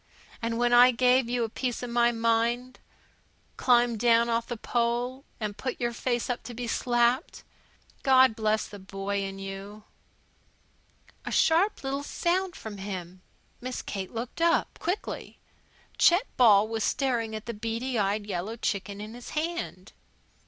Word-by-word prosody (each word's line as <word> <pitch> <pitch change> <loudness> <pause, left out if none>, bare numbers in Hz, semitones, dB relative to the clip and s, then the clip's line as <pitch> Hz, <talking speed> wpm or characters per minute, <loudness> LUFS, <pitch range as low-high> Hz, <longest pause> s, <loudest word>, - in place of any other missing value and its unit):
and 230 0 -1
when 240 0 +2
I 245 +1 +8
gave 250 0 +3
you 245 -1 0
a - - 0
piece 245 +2 -3
of 245 - -4
my 240 0 +4
mind 230 +2 0 0.8
climbed 240 -2 +3
down 235 0 +4
off 230 0 0
the 240 - -4
pole, 240 +4 -1
and 210 -2 -3
put 255 +2 -4
your 240 -1 -1
face 240 0 -1
up 245 - -2
to 240 0 -7
be 245 +1 -4
slapped, 240 +4 +1 0.6
God 260 -3 +5
bless 215 -1 0
the 205 - -10
boy 195 +1 -3
in 195 0 -5
you 195 +2 -8 1.4
A - - -5
sharp 345 +4 +3
little 270 +1 -2
sound 355 +5 -1
from 210 -2 -8
him. 185 -2 -6 0.4
Miss 255 0 -5
Kate 195 -2 -5
looked 235 +7 -5
up, 335 0 +2
quickly. 360 +4 -4 0.6
Chet 355 +7 +5
Ball 215 -4 +6
was 225 0 -2
staring 235 -5 0
at 215 - -7
the 235 - -4
beady 230 +3 -2
eyed 205 +1 0
yellow 200 +2 -3
chicken 200 -3 -3
in 215 +2 -7
his 245 0 -10
hand. 315 - -3
235 Hz, 155 wpm, -28 LUFS, 215-250 Hz, 1.4 s, I